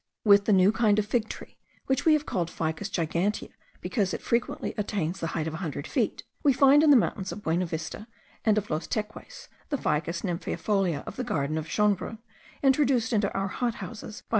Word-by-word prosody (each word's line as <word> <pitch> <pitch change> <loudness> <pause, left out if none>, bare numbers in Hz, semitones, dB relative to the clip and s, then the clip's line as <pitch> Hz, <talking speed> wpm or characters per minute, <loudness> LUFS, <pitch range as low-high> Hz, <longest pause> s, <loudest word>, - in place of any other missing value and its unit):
With 200 -1 +6
the - - +2
new 190 0 +6
kind 215 -2 +3
of 215 - +2
fig 220 0 0
tree - - -9 0.3
(which 265 -1 0
we 320 - +6
have 300 -1 +1
called 170 -3 -1
Ficus 160 +4 -3
gigantea, 175 +3 -1 0.3
because 200 -7 0
it - - -7
frequently 235 0 -1
attains 195 -4 -2
the 165 - -2
height 155 - -1
of 160 - -3
a - - -4
hundred 155 -5 -4
feet), - - -1 0.2
we 285 -3 +4
find 275 +2 +6
in 310 - +5
the 285 - +8
mountains 195 -4 -1
of 205 - -7
Buenavista 165 +4 -2 0.4
and 215 -1 +3
of 210 -3 -2
Los 155 +1 -2
Teques, 215 0 -5 0.2
the 285 - 0
Ficus 165 - -1
nymphaeifolia 180 -2 -1
of - - -8
the - - -2
garden 145 0 -1
of 160 0 -3
Schonbrunn, 210 +1 +1 0.5
introduced 265 -4 +3
into 205 -2 +2
our 195 0 -1
hot 240 +2 -1
houses 210 +3 -8
by - - -39
M. - - -46
205 Hz, 205 wpm, -27 LUFS, 170-225 Hz, 0.5 s, the